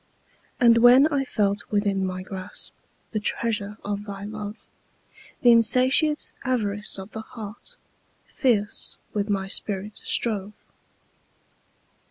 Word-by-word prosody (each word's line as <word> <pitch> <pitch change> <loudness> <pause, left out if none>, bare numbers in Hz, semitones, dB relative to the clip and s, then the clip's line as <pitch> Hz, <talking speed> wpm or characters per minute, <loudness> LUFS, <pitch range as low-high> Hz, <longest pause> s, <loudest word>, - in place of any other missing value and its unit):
And 235 -1 +6
when 245 +4 +7
I 275 -1 +1
felt 205 -5 -1
within 200 -2 0
my 185 0 -3
grasp, 185 -1 -7 0.4
The 215 - -1
treasure 210 -1 -1
of 205 0 -3
thy 200 -1 -7
love; 210 0 -6 0.9
The 245 -4 +7
insatiate 255 +6 +3
avarice 210 -6 -1
of 190 +2 -9
the 220 - -6
heart 220 - -9 0.6
Fierce 220 -5 0 0.2
with 205 0 -1
my 195 -2 0
spirit 200 +1 -2
strove. 210 -3 +1
210 Hz, 115 wpm, -24 LUFS, 200-235 Hz, 0.9 s, when